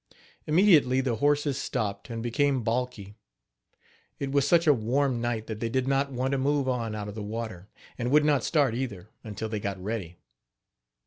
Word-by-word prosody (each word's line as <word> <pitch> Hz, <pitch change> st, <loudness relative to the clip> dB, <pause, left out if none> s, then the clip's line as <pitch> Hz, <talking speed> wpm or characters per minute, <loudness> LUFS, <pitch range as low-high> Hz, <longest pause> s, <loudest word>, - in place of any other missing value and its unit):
Immediately 150 Hz, -6 st, +5 dB
the 125 Hz, -4 st, -1 dB
horses 145 Hz, +1 st, +1 dB
stopped, 105 Hz, -5 st, -3 dB
and 115 Hz, -1 st, -5 dB
became 135 Hz, +1 st, +1 dB
balky. 115 Hz, -3 st, -2 dB, 1.0 s
It 135 Hz, -1 st, -3 dB
was 140 Hz, -1 st, +2 dB
such 170 Hz, -1 st, +4 dB
a 150 Hz, -, +6 dB
warm 125 Hz, +1 st, 0 dB
night 120 Hz, -2 st, -2 dB
that 110 Hz, -1 st, -6 dB
they 115 Hz, -, -2 dB
did 130 Hz, +2 st, 0 dB
not 140 Hz, +1 st, +1 dB
want 130 Hz, +1 st, -1 dB
to 140 Hz, -, 0 dB
move 140 Hz, 0 st, +1 dB
on 115 Hz, -4 st, -1 dB
out 105 Hz, -1 st, -5 dB
of 105 Hz, -, -6 dB
the 110 Hz, -, -6 dB
water, 105 Hz, -3 st, -6 dB, 0.3 s
and 120 Hz, 0 st, -1 dB
would 150 Hz, +2 st, +4 dB
not 145 Hz, -3 st, +3 dB
start, 145 Hz, -7 st, +2 dB
either, 110 Hz, -6 st, -4 dB
until 110 Hz, -1 st, -5 dB
they 110 Hz, -1 st, -3 dB
got 100 Hz, -1 st, -4 dB
ready. 95 Hz, -4 st, -5 dB
125 Hz, 185 wpm, -27 LUFS, 110-140 Hz, 1.0 s, a